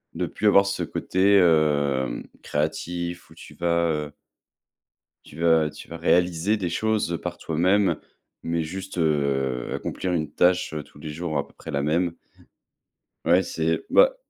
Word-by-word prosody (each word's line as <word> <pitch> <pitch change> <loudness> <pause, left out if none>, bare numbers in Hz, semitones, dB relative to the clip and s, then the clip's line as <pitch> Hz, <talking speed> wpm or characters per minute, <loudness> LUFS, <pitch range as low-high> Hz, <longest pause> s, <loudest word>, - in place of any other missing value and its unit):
de - - -1
plus 105 - -1
avoir 100 -1 +6
ce 100 - -2
côté, 95 +2 +2
hem, 70 -7 +2
créatif, 85 +3 -3
où - - -16
tu - - -13
vas 85 -1 +1
heu 75 -1 -3 1.1
tu 75 - -14
vas 80 -2 +4
tu - - -12
vas 85 - -7
réaliser 90 +4 +2
des 90 -4 -2
choses 105 -2 0
par 90 -1 -5
toi-même, 90 +2 +2 0.4
mais 85 0 -1
juste, 95 +4 -7
heu, 70 -6 0
accomplir 90 -1 -3
une 80 -3 -1
tâche 90 -2 +2
tous - - -19
les 75 - -7
jours, 80 -1 -3
à 70 - -2
peu - - -23
près - - -11
la 70 0 -1
même 85 +3 +1 1.1
Ouais, 90 +3 +4
c'est 80 0 -1
bah, - - +6
85 Hz, 155 wpm, -24 LUFS, 75-90 Hz, 1.1 s, avoir